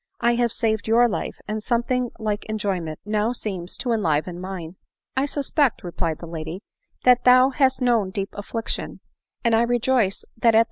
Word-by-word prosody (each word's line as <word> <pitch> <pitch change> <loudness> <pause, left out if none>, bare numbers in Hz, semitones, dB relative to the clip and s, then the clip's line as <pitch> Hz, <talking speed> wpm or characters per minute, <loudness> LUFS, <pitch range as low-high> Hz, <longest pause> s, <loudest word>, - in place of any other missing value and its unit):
I 235 0 +3
have 235 -1 +1
saved 220 -3 -1
your 235 +2 +5
life, 215 - -4
and 215 0 -3
something 245 +2 0
like 215 -2 -2
enjoyment 190 -7 -2
now 215 +2 0
seems 190 -7 -4
to 245 - -2
enliven 175 -4 0
mine." 185 -2 -6 0.2
" - - -58
I 265 +2 +1
suspect," 285 -2 +1
replied 170 -2 -2
the - - -9
lady, 165 +2 -6 0.2
" - - -42
that 250 -1 +6
thou 255 +2 +6
hast 265 -1 +2
known 230 -6 +2
deep 195 0 -3
affliction; 220 +2 -4 0.4
and 230 -2 +3
I 225 - +4
rejoice 240 -3 +1
that 230 -1 +4
at - - +8
220 Hz, 180 wpm, -23 LUFS, 190-245 Hz, 0.4 s, at